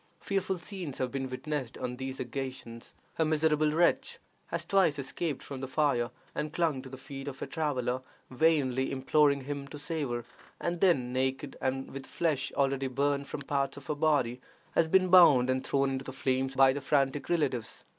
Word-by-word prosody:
Fearful 195 -1 -1
scenes 175 -5 -6
have 130 -1 -1
been 135 0 -3
witnessed 130 -1 -4
on 125 -1 -4
these 130 0 -5
occasions. 130 -2 -6 0.2
A - - +5
miserable 155 -1 +2
wretch 170 +3 +2 0.3
has - - -2
twice 190 -7 +3
escaped 140 +2 -3
from 135 -2 -7
the 135 - -3
fire 130 -4 +1 0.2
and 150 - -3
clung 155 -5 0
to 130 - -10
the 130 - -8
feet 135 +1 -8
of 135 -1 -6
a - - -2
traveler, 130 -4 -1 0.3
vainly 135 -2 +2
imploring 140 +1 +3
him 140 +1 -5
to 145 - -8
save 145 -1 -3
her; 120 -1 -3 0.3
and 170 0 -2
then, 130 -10 +3
naked, 130 +2 -1
and 135 0 -2
with 135 - -6
the - - -13
flesh 155 -6 0
already 135 -1 +1
burned 140 +2 0
from 145 - -5
parts 140 -1 -1
of 140 - -10
her - - -1
body, 145 -5 +1 0.3
has 165 - +3
been 185 +2 +4
bound 145 -9 +7
and 130 0 -1
thrown 135 0 +1
into 135 0 -3
the - - -5
flames 130 0 -1
by 135 0 +6
the 145 - -4
frantic 135 0 +1
relatives. 145 -9 -1
140 Hz, 190 wpm, -30 LUFS, 130-155 Hz, 0.3 s, bound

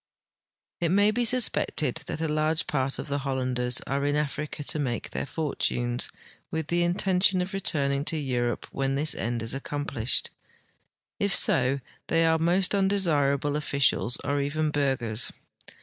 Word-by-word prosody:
It 170 -2 +1
may 205 +4 +4
be 240 +2 0
suspected 220 - +2
that 160 - -4
a 160 - 0
large 155 +1 0
part 135 -1 -1
of - - -5
the 140 0 -1
Hollanders 130 -2 0
are 140 +1 -2
in 145 0 +1
Africa 150 0 -3
to 155 - -1
make 125 -5 -3
their - - -3
fortunes, 125 -6 -2 0.4
with 160 -1 -3
the 175 0 +1
intention 185 +2 +2
of 180 +2 -3
returning 140 -7 0
to 160 - 0
Europe 125 -4 -1
when 135 0 -1
this 150 +3 +4
end 120 0 -2
is 115 - 0
accomplished. 135 -3 -1 0.9
If 200 -1 +2
so, 130 +2 +3 0.3
they 165 0 +3
are 160 0 +3
most 180 +4 +2
undesirable 150 -8 +1
officials 140 -4 +1
or 145 0 0
even 150 +2 -1
burghers. 130 -6 0
145 Hz, 150 wpm, -27 LUFS, 135-165 Hz, 0.9 s, may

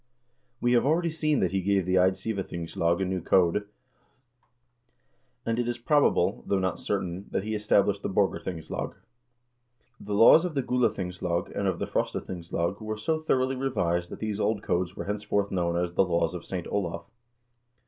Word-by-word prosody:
We 120 - +1
have 120 -1 +4
already 165 +4 +2
seen 155 -2 +1
that 90 - +1
he 95 0 0
gave 95 -1 +1
the 90 - -1
Eidsivathingslag 90 -3 0
a - - 0
new 95 -1 -2
code, 95 +4 +2 1.8
and 115 +1 0
it 120 - 0
is 120 0 -2
probable, 145 +5 +2
though 100 - +2
not 95 -2 -1
certain, 95 -1 -3
that - - -1
he 110 +1 -3
established 100 -1 +2
the - - -3
Borg 100 0 +2
arthingslag. 80 -4 -5 1.0
The 105 0 -4
laws 115 +10 +8
of 175 -4 -3
the 135 - +1
Gulathingslag 90 -8 -1
and 100 - 0
of 95 -3 0
the - - -2
Frosta - - -1
thingslag 85 +1 -3
were 110 0 -4
so 155 +9 -1
thoroughly 130 -4 +1
revised 90 -10 -1
that - - -7
these 110 -1 -3
old 105 0 0
codes 90 +1 -1
were - - -5
henceforth 105 0 -1
known 85 -2 0
as 85 0 -1
the 95 - +4
"Laws 85 -2 0
of 90 - -7
Saint 90 -3 -4
Olav." 95 -5 -3
100 Hz, 175 wpm, -27 LUFS, 90-115 Hz, 1.8 s, laws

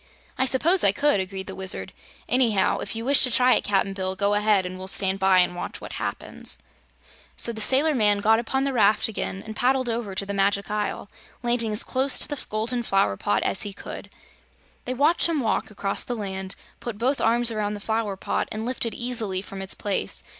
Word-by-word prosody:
"I 260 - +1
suppose 330 +9 +3
I 200 - +6
could," 285 +1 +2
agreed 190 0 -4
the - - -7
Wizard. 190 0 -2 0.3
"Anyhow, 230 -7 +2
if - - -3
you 225 +1 -4
wish 280 +1 +4
to 255 - +4
try 250 +1 +5
it, - - +1
Cap'n 195 -1 0
Bill, 190 -1 -3
go 200 +1 +1
ahead 205 -2 +3
and 185 +1 -6
we'll 190 - -7
stand 190 0 +1
by 190 -1 +4
and 180 0 +3
watch 175 - -6
what - - -9
happens." - - -3 0.8
So 235 - +3
the 220 - -3
sailor 280 +7 +4
man 210 -5 +3
got 220 +2 +3
upon 265 +3 -1
the 275 -1 -1
raft 215 -3 +4
again 195 -3 -4
and 220 0 -7
paddled 255 +1 +1
over 225 -4 -3
to 200 - -2
the 200 - -4
Magic 200 +1 +1
Isle, 210 -1 -2 0.4
landing 240 -2 +1
as 210 - -1
close 265 +1 +1
to - - +2
the 290 -2 -5
golden 225 +3 0
flower 195 - +1
pot 105 +2 0
as 190 - +2
he 205 -2 0
could. - - -9 0.8
They 255 - -3
watched 305 +6 +3
him 320 -3 0
walk 225 -5 -1
across 200 -1 -2
the 245 - -4
land, 190 -3 -5 0.2
put 235 -4 -6
both 260 +5 0
arms 235 +1 +2
around 210 -1 -2
the - - -7
flower 220 -2 -2
pot - - -2
and 215 +1 -4
lift 245 -1 -1
it 230 - -5
easily 225 -6 -2
from 195 -1 -8
its 190 - -2
place. 205 -2 -2
215 Hz, 220 wpm, -24 LUFS, 195-245 Hz, 0.8 s, I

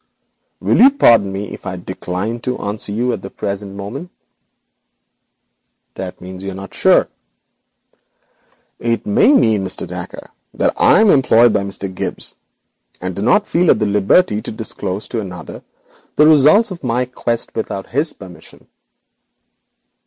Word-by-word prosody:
'Will - - +1
you 265 - +9
pardon 115 - +4
me 100 +1 -5
if - - -9
I 95 - -3
decline 95 +5 -4
to 125 +1 -3
answer 100 0 -5
this 105 - -4
question 125 +2 +1
at 100 - -5
the 95 - -8
present 100 0 -5
moment?' 120 - -7 1.8
'That 95 -1 -7
means 95 +1 -9
you 95 - -5
are - - -6
not 95 0 -9
sure.' - - +4 1.7
'It 115 -1 -1
may 105 - +4
mean, 110 - +3
Mr. 95 - -3
Dacre, - - -8 0.2
that - - +1
I - - +5
am 215 -3 +5
employed 120 -3 +4
by 105 - +1
Mr. 100 0 -4
Gibbes, - - -4 0.6
and 90 0 -4
do - - -3
not 130 - +3
feel 175 -3 +1
at - - +5
liberty 105 - +2
to - - -6
disclose 105 -3 -5
the 100 -6 -6 0.6
results 155 - +5
of 170 -4 -8
my 125 0 0
quest 120 -2 -3
without 100 -3 -4
his 145 +6 0
permission.' 95 -3 -13
110 Hz, 145 wpm, -17 LUFS, 95-125 Hz, 1.8 s, you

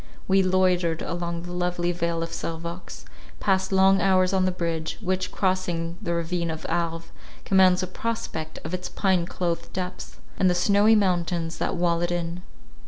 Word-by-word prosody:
We 195 0 +4
loitered 185 -3 +2
along 170 0 -3
the 175 - -7
lovely 175 0 -1
Vale 170 -1 -1
of 165 - -5
Servox; 170 - -6 0.4
passed 190 0 +1
long 190 0 +5
hours 185 -1 +3
on 190 -1 +3
the 185 - +2
bridge, 165 -3 -3
which, 185 -2 -1
crossing 175 -3 -1
the 170 -5 -1
ravine 170 0 -1
of 160 -1 -5
Arve, 165 -1 -2 0.3
commands 185 -1 +5
a - - +1
prospect 185 -6 -4
of 160 - -6
its 180 0 -3
pine 185 -4 +1
clothed 170 -2 -3
depths, 185 -1 -5 0.2
and 185 - +4
the 180 - +2
snowy 205 +4 +4
mountains 175 -4 0
that - - -1
wall 170 -1 +1
it 175 - 0
in. 175 0 -3
175 Hz, 170 wpm, -25 LUFS, 170-185 Hz, 0.4 s, long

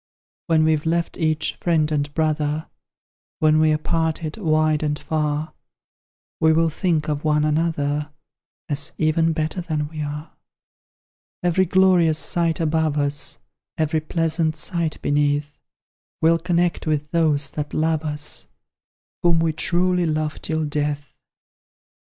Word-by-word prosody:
When 160 -2 +3
we've 155 0 +1
left 170 +1 -1
each 155 -1 0
friend 160 -3 0
and 145 -1 -1
brother, 155 -1 0 0.7
When 155 0 +3
we're 155 -1 +3
parted 160 0 -2
wide 155 -5 +1
and 150 -1 -1
far, 150 0 -2 0.9
We 160 -1 +4
will 165 0 +2
think 160 -2 0
of 150 -1 -2
one 150 -1 +2
another, 150 -2 0 0.6
As 145 -2 0
even 160 +1 +2
better 160 +3 -2
than 155 -3 -2
we 155 -1 -6
are. 150 +1 -5 1.1
Every 180 +2 +3
glorious 180 -3 +4
sight 165 +2 +1
above 160 -2 +1
us, 145 0 0 0.4
Every 155 0 0
pleasant 160 0 0
sight 160 0 -1
beneath, 145 0 0 0.6
We'll 165 +1 +3
connect 175 -1 0
with 150 0 -1
those 150 -4 +1
that 150 -1 -4
love 160 0 +1
us, 150 -1 -3 0.7
Whom 170 -1 +3
we 165 -1 +1
truly 180 +2 +1
love 155 -1 -2
till 160 -1 -1
death! 145 -1 -2
155 Hz, 125 wpm, -22 LUFS, 150-165 Hz, 1.1 s, We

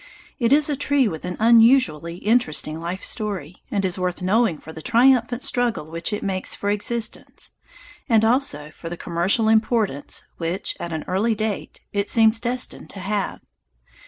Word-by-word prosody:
It 235 -1 +1
is 295 +1 +5
a 295 - 0
tree 285 -2 +2
with 160 -5 -5
an 180 0 -4
unusually 225 - +4
interesting 175 -7 +1
life 175 +3 -5
story, 190 -7 -4
and 200 -2 0
is 185 0 -1
worth 180 0 -2
knowing 200 -2 +2
for 160 - -11
the 160 - -8
triumphant 245 - +3
struggle 235 -11 -1
which 165 +4 -2
it 210 - -3
makes 190 -1 -2
for 205 - -1
existence, 225 +3 -2 0.6
and 220 -2 +4
also 220 - +1
for 165 - -9
the 175 - -6
commercial 180 +7 +1
importance 220 - +1
which, 170 +3 -2
at 170 - -5
an 160 -1 -3
early 215 +5 +1
date, 215 -1 -4
it 200 0 -1
seems 225 0 +4
destined 245 +2 -3
to 200 - -8
have. 200 +1 -2
205 Hz, 165 wpm, -22 LUFS, 175-235 Hz, 0.6 s, is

